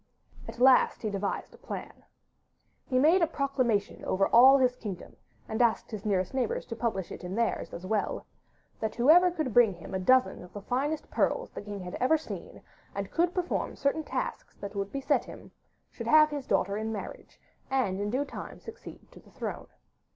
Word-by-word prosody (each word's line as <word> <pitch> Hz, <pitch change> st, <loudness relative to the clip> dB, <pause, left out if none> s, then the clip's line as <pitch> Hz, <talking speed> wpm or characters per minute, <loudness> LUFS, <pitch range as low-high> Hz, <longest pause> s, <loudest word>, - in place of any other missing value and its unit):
At -, -, -8 dB
last 255 Hz, -1 st, +5 dB
he 215 Hz, -, -1 dB
devised 200 Hz, 0 st, -3 dB
a -, -, -16 dB
plan. -, -, -8 dB, 0.8 s
He 255 Hz, -, +1 dB
made 320 Hz, +8 st, +5 dB
a 335 Hz, -, +4 dB
proclamation 255 Hz, -9 st, -1 dB
over 195 Hz, +1 st, +1 dB
all 260 Hz, +4 st, +8 dB
his 250 Hz, -2 st, +2 dB
kingdom 205 Hz, -7 st, -7 dB, 0.3 s
(and 220 Hz, +2 st, -1 dB
asked 235 Hz, 0 st, +1 dB
his 215 Hz, -1 st, -5 dB
nearest 185 Hz, -1 st, 0 dB
neighbours 255 Hz, -4 st, -1 dB
to 230 Hz, -, -6 dB
publish 215 Hz, -6 st, -2 dB
it -, -, -8 dB
in 180 Hz, +2 st, -5 dB
theirs 230 Hz, 0 st, -1 dB
as 175 Hz, -, -8 dB
well) 210 Hz, +1 st, -1 dB, 0.5 s
that 220 Hz, -1 st, -3 dB
whoever 320 Hz, +9 st, +6 dB
could 310 Hz, -9 st, -3 dB
bring 235 Hz, -5 st, +5 dB
him 170 Hz, +2 st, -10 dB
a 190 Hz, -, -1 dB
dozen 255 Hz, +7 st, +3 dB
of 180 Hz, -, -14 dB
the 205 Hz, -, -7 dB
finest 285 Hz, +7 st, -2 dB
pearls -, -, 0 dB
the -, -, -7 dB
king 205 Hz, -1 st, -7 dB
had 180 Hz, 0 st, -7 dB
ever 265 Hz, +6 st, +4 dB
seen, 310 Hz, -, -9 dB, 0.3 s
and -, -, -4 dB
could 345 Hz, +1 st, +2 dB
perform 360 Hz, -1 st, -2 dB
certain 280 Hz, +3 st, 0 dB
tasks -, -, -4 dB
that 200 Hz, 0 st, -8 dB
would 200 Hz, -1 st, -3 dB
be 275 Hz, -, -4 dB
set 275 Hz, -, +1 dB
him, -, -, -12 dB, 0.4 s
should -, -, -7 dB
have 305 Hz, 0 st, +6 dB
his 285 Hz, -3 st, -5 dB
daughter 200 Hz, +1 st, +1 dB
in 220 Hz, +1 st, -3 dB
marriage 210 Hz, -3 st, -8 dB, 0.3 s
and 250 Hz, -8 st, 0 dB
in 205 Hz, -, -1 dB
due 265 Hz, +6 st, 0 dB
time -, -, -8 dB
succeed 450 Hz, +2 st, -11 dB
to -, -, -14 dB
the -, -, -20 dB
throne. -, -, -6 dB
245 Hz, 195 wpm, -29 LUFS, 205-280 Hz, 0.8 s, all